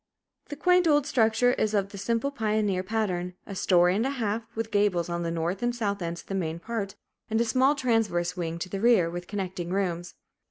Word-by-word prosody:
The 290 - -5
quaint 360 +3 +3
old 295 -3 +4
structure 245 -2 +3
is 215 -4 0
of 200 -1 +1
the 200 - -9
simple 230 +6 0
pioneer 215 -6 0
pattern, 185 -3 -2
a 200 - -7
story 180 -1 +3
and 215 - +1
a 265 - 0
half, 225 -4 -2
with 225 0 -3
gables 200 -5 +2
on 170 0 -2
the 170 - -2
north 170 +3 -2
and 240 0 0
south 200 -4 -2
ends 170 0 -4
of - - -25
the - - -5
main 165 -4 -2
part; 200 +1 -4 0.3
and 220 0 +1
a 235 - +2
small 260 +4 +3
transverse 215 -10 0
wing 165 -2 -3
to 185 +2 -5
the 195 0 -4
rear, 220 -8 +4
with 175 +1 -6
connecting 185 -4 -4
rooms. 175 -2 -2
205 Hz, 215 wpm, -27 LUFS, 175-230 Hz, 0.3 s, old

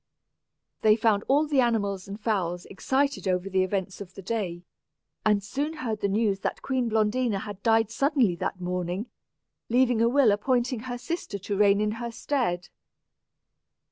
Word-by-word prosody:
They 215 -1 +6
found 215 -2 +2
all 290 +3 +4
the 290 -3 +3
animals 200 -6 0
and 200 +2 -7
fowls 180 -6 -1
excited 270 +4 -1
over 185 +1 0
the 190 0 +3
events 190 0 -2
of 190 -2 -9
the 195 - -9
day, 180 -5 -3 0.6
and 210 -2 +3
soon 285 +9 -2
heard 235 -9 -4
the - - +2
news 200 -1 +1
that - - -3
Queen 255 -3 0
Blondina 220 -1 +1
had 205 -2 -8
died 225 -1 +3
suddenly 265 - +2
that 185 - -3
morning, 180 +4 -3 0.6
leaving 245 -1 +3
a 230 - +4
will 260 -3 +5
appointing 245 +3 +1
her 245 - -3
sister 330 -5 -4
to 200 +1 -4
reign 200 0 +4
in 210 0 +1
her 235 - -3
stead. 225 -8 -1
215 Hz, 165 wpm, -27 LUFS, 195-245 Hz, 0.6 s, They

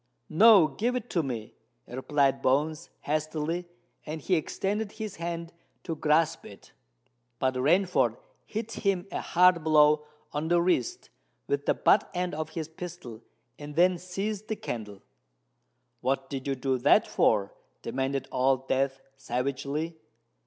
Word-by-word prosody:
"No—give 205 - +5
it 245 -1 -4
to 170 - +2
me," 120 -7 -5 0.3
replied 135 +2 +1
Bones 150 +4 +1
hastily; 155 +3 -2 0.4
and 155 +1 -5
he 185 - -1
extended 200 +5 -1
his 215 -3 -6
hand 170 0 -5 0.3
to 165 - -3
grasp 155 +1 +2
it. - - -14 0.7
But 130 +1 +1
Rainford 175 +9 +2 0.3
hit 220 +1 -4
him 195 -5 -1
a - - -3
hard 180 -1 +4
blow 150 -1 +4 0.2
on 150 +2 -2
the 175 +1 +3
wrist 185 - 0 0.3
with 425 - -2
the - - +3
butt - - +3
end 180 0 -1
of 155 +1 -3
his 160 -2 -2
pistol, 160 -9 -9 0.4
and 145 0 -8
then 180 +1 +4
seized 195 +4 -4
the 220 - -2
candle. 105 - -6 1.0
"What 135 +1 -1
did 135 0 -4
you 135 - 0
do 130 0 -1
that 145 - +5
for?" 100 -3 +2 0.3
demanded 135 0 -2
Old 130 +1 +1
Death 135 0 0 0.2
savagely. 140 +5 -3
155 Hz, 140 wpm, -28 LUFS, 135-180 Hz, 1.0 s, No—give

